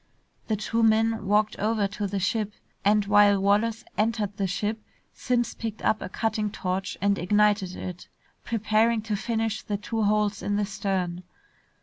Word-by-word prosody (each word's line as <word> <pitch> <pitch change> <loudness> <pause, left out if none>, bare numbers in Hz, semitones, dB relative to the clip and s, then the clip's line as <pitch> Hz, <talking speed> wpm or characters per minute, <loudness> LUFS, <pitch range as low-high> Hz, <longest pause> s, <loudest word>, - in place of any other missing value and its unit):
The 220 - +1
two 225 +2 -1
men 225 -1 +2
walked 210 +1 +2
over 215 -1 +1
to 205 +1 -3
the 200 +1 -3
ship, 210 +2 -1 0.3
and 205 0 +3
while 205 -1 +5
Wallace 210 +3 +1 0.2
entered 215 -2 0
the 195 -1 -1
ship, 210 +4 -2 0.3
Simms 240 -1 0
picked 225 -2 -6
up 220 - +2
a - - -5
cutting 215 +1 -1
torch 190 -1 -3
and 200 0 +2
ignited 205 0 +2
it, 180 -1 -7 0.4
preparing 220 0 +1
to 215 -1 -2
finish 225 0 -1
the 205 - -3
two 225 +2 -3
holes 210 -1 +1
in 205 - -1
the 205 0 +1
stern. 190 -3 -2
210 Hz, 160 wpm, -26 LUFS, 200-220 Hz, 0.4 s, while